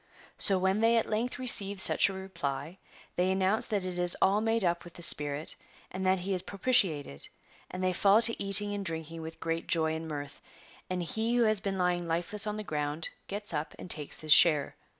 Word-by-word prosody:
So 195 - +3
when 190 +2 0
they 230 +1 +3
at 225 - 0
length 230 +4 -2
receive 205 -6 +2
such 195 - +5
a - - -6
reply, 170 -4 -6 0.4
they 180 +1 +1
announce 190 +3 0
that 200 -3 -2
it 180 -1 -5
is 175 0 +2
all 200 +2 +2
made 225 -2 0
up 170 0 -1
with 175 - -14
the 175 - -5
spirit, 145 -1 +3 0.4
and 185 +1 -5
that 190 -1 +1
he 195 +2 -3
is 180 - -1
propitiated, 180 - 0 0.4
and 185 0 -6
they 185 0 0
fall 200 +4 +4
to 230 -2 +2
eating 200 +1 +4
and 200 -1 -4
drinking 165 -2 -5
with 160 0 -9
great 165 0 -4
joy 160 -1 +1
and 160 0 -6
mirth, 145 -2 -7 0.5
and 180 -1 -3
he 220 +7 -1
who 240 - +3
had 215 -3 +1
been 195 -2 -3
lying 180 -1 -1
lifeless 175 +6 -1
on 210 0 -3
the 215 - -5
ground 150 -2 -4 0.2
gets 205 -2 -4
up 150 0 -4
and 180 - -4
takes 150 -2 -1
his 155 -1 +5
share. 155 -4 +4
185 Hz, 210 wpm, -29 LUFS, 165-205 Hz, 0.5 s, such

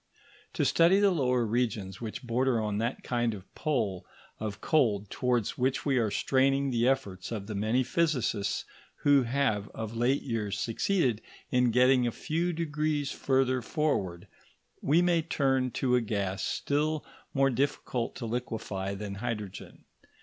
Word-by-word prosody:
To - - 0
study 170 +4 +5
the 200 -1 +4
lower 125 -7 +1
regions 105 -4 -1
which 115 +3 -5
border 125 0 +1
on 105 -1 -1
that 115 +3 -2
kind 120 -2 0
of 95 -2 -13
pole 110 - -1 0.4
of 105 -1 -4
cold 105 -10 +1
towards 125 -3 0
which 130 +2 0
are 125 -6 +2
straining 135 +4 +2
the 120 0 +2
efforts 100 -9 -1
of 105 -4 -4
the 110 - -5
many 110 +5 +1
physicists 125 -9 0 0.4
who 145 -1 +6
have 120 -5 0
of 110 0 -5
late 125 +4 +1
years 105 -5 -2
succeeded 120 - 0 0.3
in 125 -1 +3
getting 125 +1 +4
a - - 0
few 165 +8 -1
degrees 150 -3 -1
further 130 -1 +1
forward, 105 - -1 0.5
we 160 +5 +3
may 175 -2 +3
turn 135 -5 +1
to 125 +1 0
a 125 - +3
gas 100 -4 -2
still 150 +6 -1 0.3
more 135 -1 +3
difficult 125 -2 -1
to 120 - -5
liquefy 110 -5 -3
than 100 0 -5
hydrogen. 105 -5 -5
125 Hz, 150 wpm, -29 LUFS, 110-140 Hz, 0.5 s, who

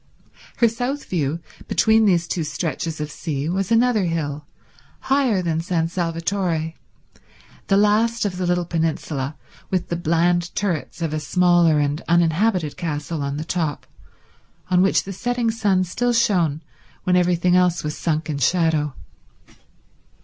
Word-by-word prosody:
Her 235 - +5
south 245 +5 -3
view, 160 -2 -2 0.3
between 220 0 +4
these 175 -4 +2
two 170 - -2
stretches 160 0 -3
of 150 0 -4
sea, 145 -3 -3
was 190 +3 -1
another 230 -3 +3
hill, 150 -3 -3 0.5
higher 265 -8 +1
than 165 -1 0
San 165 -2 -1
Salvatore, 170 -1 -1 0.9
the 195 - +3
last 215 +3 +2
of 185 -3 -2
the 180 -1 -1
little 175 0 +1
peninsula, 160 -4 -2 0.3
with 185 -2 -1
the 170 - -1
bland 170 +1 +1
turrets 175 -3 -2
of 160 -2 -2
a 155 - -1
smaller 175 0 +3
and 145 +2 0
uninhabited 170 0 +2
castle 150 -1 -3
on 140 0 -3
the 155 - -4
top, 160 -4 -2 0.9
on 180 0 +5
which 195 - +3
the 195 - -6
setting 245 +2 -1
sun 200 -5 +1
still 240 +7 -1
shone 175 -10 +1 0.4
when 180 - +2
everything 180 0 +3
else 180 -2 +2
was 150 0 -3
sunk 160 -1 -1
in 150 -3 -3
shadow. 155 -1 +1
175 Hz, 145 wpm, -22 LUFS, 160-195 Hz, 0.9 s, Her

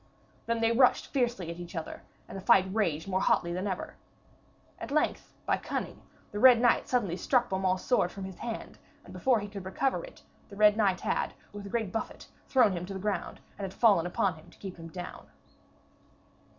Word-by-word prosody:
Then 230 0 0
they 225 0 +3
rushed 250 +2 +3
fiercely 240 - 0
at 170 - -8
each 175 +1 -8
other, 165 - -5 0.3
and - - -9
the 195 - -5
fight 190 -1 +5
raged 170 -7 0
more 190 0 0
hotly 170 0 +2
than 185 +3 -2
ever. 190 -2 -4 0.9
At - - -6
length, 300 +2 0
by - - +2
cunning, - - -5 0.3
the 205 - -4
Red 250 0 +8
Knight 240 0 +3
suddenly 205 -9 0
struck 245 +7 +1
Beaumains' 190 -1 0
sword 180 -8 +2
from 195 - -7
his 190 -1 -8
hand, 230 -2 -6 0.3
and - - -12
before 255 -4 +2
he 205 - -5
could 200 -2 -8
recover 225 - -1
it, - - -13 0.3
the 200 - -11
Red 210 0 +5
Knight 200 -4 +2
had - - -1 0.2
with 205 -1 -7
a - - -8
great 220 -3 -2
buffet 225 - -5 0.2
thrown 245 -6 +4
him 180 -1 -4
to 195 - -6
the - - -4
ground, 205 +1 -3 0.2
and - - -4
had 190 - -7
fallen 200 -7 +5
upon 180 +1 0
him 155 - -16
to - - -20
keep 190 -3 -8
him 165 -1 -9
down. 175 +2 -8
200 Hz, 205 wpm, -29 LUFS, 185-230 Hz, 0.9 s, Red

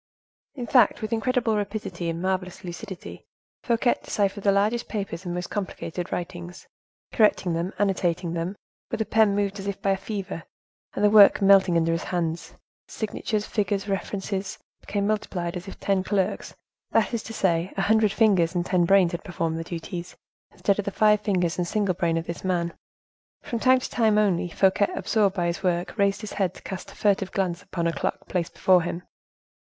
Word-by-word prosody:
In 250 -4 -4
fact, 245 -1 +4
with 215 - -2
incredible 235 -1 +1
rapidity 200 -4 -3
and 165 0 -3
marvelous 185 0 -2
lucidity, 185 +2 -8 0.3
Fouquet 240 0 +2
deciphered 200 -1 -1
the 200 - +4
largest 210 +4 +1
papers 195 -4 -4
and 175 0 -3
most 180 0 -4
complicated 180 -3 -4
writings, 175 0 -6 0.4
correcting 210 -5 +3
them, 170 +3 -2
annotating 180 -4 0
them 170 +3 -3 0.3
with - - -3
a 220 - 0
pen 215 -2 +3
moved 200 0 -1
as 195 - -6
if 200 -1 -3
by 200 -1 +1
a 195 - +1
fever, 195 -3 -5 0.5
and 205 - +2
the 205 - +5
work 210 -2 +8
melting 195 -3 +5
under 165 0 +2
his 165 0 -2
hands, 170 -2 -3 0.3
signatures, 215 -1 -3
figures, 200 -1 -1
references, 195 0 -3 0.2
became 200 -1 -2
multiplied 190 -5 -2
as 180 +2 -6
if 195 - -9
ten 195 -2 +1
clerks—that 205 +3 -2
is 230 - -1
to 225 - -9
say, 180 -4 0
a 195 - +1
hundred 220 -1 +3
fingers 190 -6 +3
and 175 0 0
ten 180 -2 +2
brains 190 -1 +4
had 170 - -5
performed 165 -3 -2
the - - -3
duties, 170 +1 -6 0.3
instead 200 0 0
of 205 - -1
the - - 0
five 210 +1 +3
fingers 180 -5 0
and 175 - 0
single 200 -1 +1
brain 170 -1 0
of 165 - -3
this 170 - -6
man. 175 -2 0 0.7
From 235 - -3
time 255 +2 +5
to - - -4
time, 220 -3 +2
only, 190 -4 +2
Fouquet, 190 +2 +3
absorbed 210 - +1
by 175 -3 0
his 170 +1 -2
work, 175 -2 -1
raised 200 +1 +2
his 215 - -6
head 195 -3 -1
to - - -14
cast 190 -1 -7
a - - -15
furtive 195 -2 +1
glance 180 -2 -1
upon 170 -4 -4
a 170 - +1
clock - - -3
placed 175 -3 -2
before 185 -2 +4
him. 175 +1 -4
195 Hz, 190 wpm, -25 LUFS, 175-210 Hz, 0.7 s, work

